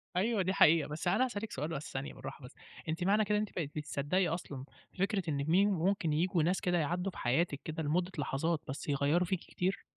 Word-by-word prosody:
أيوه، 215 +3 +2
دي 190 +1 0
حقيقة، 160 -4 +5
بس 155 +4 -4
أنا 175 - +3
عايز 255 - 0
أسألِك 210 +2 -4
سؤال 150 +4 -3
بس 155 -3 -5
ثانية 135 +2 -4
بالراحة 140 - -8
بس، 125 - -13 0.3
أنتِ 165 +2 -1
معنى 210 +3 +3
كده 210 +1 +1
ان - - +2
أنت 215 - -4
بقيتِ 155 -5 -2
بتصدّقي 150 +4 0
أصلًا 145 -5 -4 0.3
فكرة 195 0 +1
إن 140 -1 -1
مين 190 +5 +4
ممكن 180 -3 +1
ييجوا 170 +1 +2
ناس 180 +3 +1
كده 180 -1 +1
يعدّوا 175 +4 0
في - - -13
حياتِك 140 +3 +1
كده، 160 0 -4
لمدة 175 +5 0
لحظات 150 +3 0
بس 135 - -5
يغيَّروا 145 +5 +2
فيكِ 185 0 -1
كتير؟ 185 +3 -3
170 Hz, 220 wpm, -33 LUFS, 150-190 Hz, 0.3 s, حقيقة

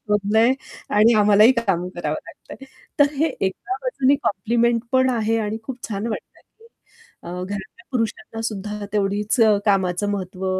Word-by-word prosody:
शोधलंय 210 +3 +2 0.4
आणि 220 +3 +6
आम्हालाही 210 +3 +6
काम 195 -8 -1
करावं 155 -3 -2
लागतंय." 270 +9 -12 0.3
तर 290 0 +4
हे 315 +4 +2
एका 195 - -2
बाजूनी 285 - +2
कॉम्प्लिमेंट 230 +4 +1
पण 260 0 +4
आहे 225 -2 0
आणि 215 +2 -3
खूप 255 0 -8
छान 210 +1 -3
वाटतंय. 220 - -6 0.8
अ, - - -9 0.2
घरातल्या 200 - -8
पुरुषांना 225 -1 -3
सुद्धा 210 -1 -4
तेवढीच 205 +3 0
अ, 215 -2 +6
कामाचं 195 -1 +1
महत्व 190 -1 -4
210 Hz, 140 wpm, -22 LUFS, 195-235 Hz, 0.8 s, आणि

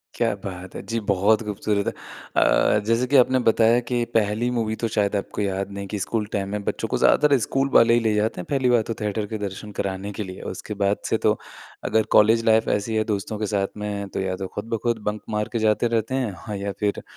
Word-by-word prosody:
क्या 115 -3 +1
बात 95 -1 -7
है! - - -5
जी 115 +1 -1
बहुत 100 +3 +3
खूबसूरत 105 -1 -1
है। - - 0 0.4
अ, - - +4
जैसे 115 +3 +2
कि 140 - +1
आपने 130 +1 +4
बताया 115 +1 +5
कि 120 -1 +1
पहली 110 +3 +1
मूवी 110 -1 -1
तो - - +3
शायद 105 0 +1
आपको 100 +1 -3
याद 100 0 -2
नहीं 100 0 -6
कि 105 - -1
स्कूल 110 +2 -1
टाइम 100 -1 -1
में 105 0 -3
बच्चों - - -2
को - - -1
ज़्यादातर 145 -2 +4
स्कूल 135 0 0
वाले 115 0 +6
ही 120 - +5
ले 110 -2 +1
जाते 105 -2 0
हैं, - - -9
पहली 135 -3 +1
बार 120 -2 +4
तो - - 0
थिएटर 105 0 -1
के 110 - -4
दर्शन 100 +2 -7
कराने 100 +1 -3
के 105 - 0
लिए। 95 -1 -8
उसके 105 - -7
बाद 100 +1 +2
से - - +2
तो - - +4 0.5
अगर 110 - +2
कॉलेज 115 +2 +5
लाइफ़ 110 0 +4
ऐसी 105 +2 0
है 110 - +2
दोस्तों 105 0 -3
के 105 - -1
साथ 95 0 +1
में 100 -1 -4
तो - - -4
या 95 -1 -1
तो 95 0 -5
खुद 105 +4 -7
ब - - +2
खुद 120 -2 0
बंक 105 0 -5
मार 105 0 -1
के 115 - 0
जाते 110 +2 +2
रहते 115 +4 -2
हैं 105 -4 -3
या 100 0 -3
फिर 105 -1 -1
105 Hz, 240 wpm, -23 LUFS, 100-115 Hz, 0.5 s, वाले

